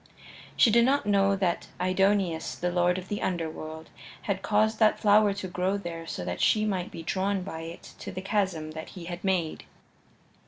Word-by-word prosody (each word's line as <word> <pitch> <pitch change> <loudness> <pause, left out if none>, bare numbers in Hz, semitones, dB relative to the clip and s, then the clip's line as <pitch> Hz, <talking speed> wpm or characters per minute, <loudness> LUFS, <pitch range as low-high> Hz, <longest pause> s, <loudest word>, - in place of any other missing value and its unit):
She 230 - +6
did 235 +2 +5
not 270 0 +2
know 200 -1 +3
that 185 -3 -1
Aidoneus, 185 -2 +1
the 180 0 -2
lord 175 0 +2
of 185 0 -6
the 205 - -3
Underworld, 160 -2 -4 0.3
had 195 -2 -2
caused 215 +2 +2
that 215 -1 +4
flower 210 -1 +5
to 200 -2 -4
grow 185 +2 -1
there 165 -4 -6
so 90 - -4
that 90 - -3
she 215 -1 +3
might 190 -4 -1
be 165 - -8
drawn 190 +2 -1
by 170 -4 -6
it 165 +1 -9
to - - -6
the - - -5
chasm 190 -6 -1
that 160 0 -7
he 180 -3 -9
had 175 0 -6
made. 180 -5 -1
185 Hz, 190 wpm, -28 LUFS, 170-205 Hz, 0.3 s, She